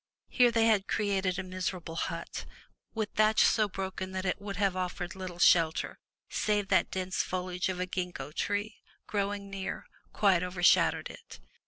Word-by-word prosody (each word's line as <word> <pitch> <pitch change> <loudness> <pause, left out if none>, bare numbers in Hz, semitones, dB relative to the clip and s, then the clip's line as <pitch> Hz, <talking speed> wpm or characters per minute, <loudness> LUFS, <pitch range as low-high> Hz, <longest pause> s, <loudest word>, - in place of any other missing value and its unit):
Here 245 -1 +5
they 230 -1 +3
had 210 -4 +3
erected 195 -3 0
a 190 - -2
miserable 185 -2 -4
hut, - - -4 0.5
with 220 -2 -1
thatch 215 0 +4
so 215 -2 +3
broken 190 0 -5
that 190 0 -3
it 185 +2 -1
would 200 -1 -5
have 195 -1 +1
offered 180 -1 -3
little 185 -2 -7
shelter, 165 -2 +3 0.3
save 205 -2 0
that - - +3
dense 185 0 -1
foliage 180 0 -2
of 185 -1 -3
a 180 - 0
gingko 180 -6 -4
tree, 205 +6 -2 0.3
growing 200 -1 -2
near, 195 -1 -5 0.3
quite 190 -4 +3
overshad 180 -1 +4
owed - - -7
it. - - -13
190 Hz, 165 wpm, -30 LUFS, 180-205 Hz, 0.5 s, Here